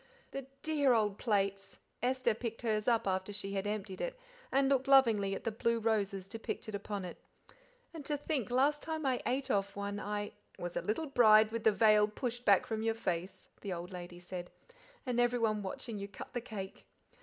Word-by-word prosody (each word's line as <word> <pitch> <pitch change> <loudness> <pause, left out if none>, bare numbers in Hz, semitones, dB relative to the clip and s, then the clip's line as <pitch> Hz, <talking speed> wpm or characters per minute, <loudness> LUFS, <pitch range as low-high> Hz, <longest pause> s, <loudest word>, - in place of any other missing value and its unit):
"The 275 -1 -5 0.2
dear 290 -4 +3
old 210 -3 +1
plates!" 200 -3 0 0.2
Esther 255 -1 +2
picked 230 +1 -5
hers 215 -2 0
up 230 -1 +3
after 190 +1 -1
she 200 -1 -3
had 195 +1 -1
emptied 205 -2 -3
it - - -3 0.3
and 270 +1 +3
looked 270 -1 +2
lovingly 225 -8 +5
at - - -7
the 230 - -1
blue 230 +2 +1
roses 200 -4 0
depicted 225 0 -5
upon 200 -1 -4
it. 175 - -8 0.7
"And 320 -3 -7
to 295 0 0
think 285 -5 -2
last 280 +4 +3
time 315 -1 -3
l 255 -2 +2
ate 265 +1 0
off 200 0 0
one 200 0 -3
I 205 0 -3
" - - -29
"Was 175 0 -5
a - - 0
little 270 +10 -1
bride 220 -6 +6
with 230 -1 -4
the 220 - +7
veil 210 0 +5
pushed 245 +3 -4
back 200 -2 +5
from 220 -1 -2
your 225 0 +1
face," 180 -4 -3
the 200 -3 -3
old 175 +1 -6
lady 175 -1 -7
said, 180 0 -7 0.6
"and 245 -2 0
everyone 235 -3 +2
watching 205 +3 -5
you 200 - -4
cut 200 - -10
the 245 - -2
cake. 200 -5 -7
215 Hz, 200 wpm, -33 LUFS, 200-245 Hz, 0.7 s, the